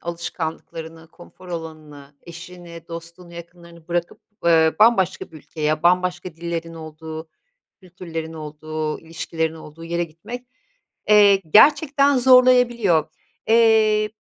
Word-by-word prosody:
alışkanlıklarını, 165 -1 -7
konfor 175 +2 -16
alanını, 155 -4 -9
eşini, 170 -1 -12
dostunu, 170 +1 -10
yakınlarını 170 -1 -14
bırakıp, 175 0 -3 0.3
ııı, 160 -1 +4
bambaşka 215 -5 +2
bir 160 - -13
ülkeye, 155 0 -3
bambaşka 180 -1 0
dillerin 165 0 -5
olduğu, 160 0 -9 0.5
kültürlerin 170 -3 -8
olduğu, 155 0 -6
ilişkilerin 160 0 -4
olduğu 160 0 -12
yere 170 +1 -2
gitmek, 200 +10 -10 0.6
eee, 205 -2 +6 0.2
gerçekten 280 +3 +5
zorlayabiliyor. 245 - +4 0.4
Eee 220 -2 +4
170 Hz, 100 wpm, -21 LUFS, 160-190 Hz, 0.6 s, eee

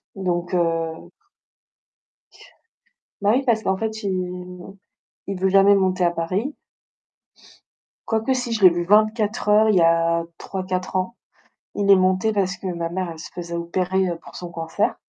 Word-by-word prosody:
Donc 175 -2 -2
heu 165 -2 -1 2.1
Bah 205 +1 +3
oui 270 - +1
parce 225 -3 +2
qu'en 190 0 0
fait 220 0 -4
il 180 0 -5 0.5
il 195 -2 -3
veut 190 - +2
jamais 195 +1 +6
monter 185 -2 +1
à 170 - +3
Paris 190 - -2 1.5
quoique, 225 +3 0
si 245 -2 -3
je 220 -3 -2
l'ai 185 - +9
vu 175 0 -2
24 215 +2 +2
heures, 215 +1 +5
il 210 - +3
y 175 - +4
a 165 0 +3
3-4 185 -1 -4
ans. 185 +6 -1 0.6
Il 200 -1 -1
est 195 - +9
monté 185 +3 +2
parce 195 -2 -1
que 190 - -7
ma 170 -2 -3
mère 180 0 -3
elle 160 - -10
se - - -8
faisait 170 -1 -6
opérer, 185 +2 -1
heu, 170 - -3
pour - - -15
son 175 -1 -7
cancer. 165 +5 -1
185 Hz, 165 wpm, -22 LUFS, 175-205 Hz, 2.1 s, l'ai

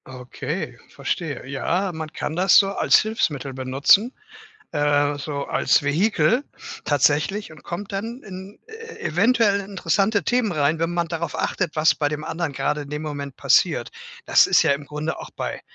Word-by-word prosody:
Okay, 125 -1 -6
verstehe. 150 -8 -4
Ja, 175 +8 -1
man 160 -1 -6
kann 155 - -4
das 185 +3 +5
so 195 -2 +5
als - - +4
Hilfsmittel 150 - -2
benutzen, 135 - +3 0.6
äh, 145 -1 +2
so 140 -1 -4
als - - +2
Vehikel 180 - +2 0.4
tatsächlich 150 +7 +1
und 155 - -16
kommt 195 +4 -6
dann 225 +6 -4
in 190 0 -10
e 455 +1 -10
eventuell 205 +3 +2
interessante 200 +1 0
Themen 240 +2 +1
rein, 155 0 +1
wenn 165 0 0
man 170 -1 0
darauf 165 0 -4
achtet, 175 -4 -1
was 155 0 +4
bei 145 -1 0
dem 150 0 -4
anderen 165 -3 -3
grade 150 +2 -1
in 145 - -9
dem 150 +1 -4
Moment 145 -3 -6
passiert. - - +2 0.3
Das - - +6
ist - - +4
ja - - +3
im 140 +1 -2
Grunde 150 +2 -4
auch - - -8
bei - - -5
160 Hz, 170 wpm, -23 LUFS, 145-200 Hz, 0.6 s, Das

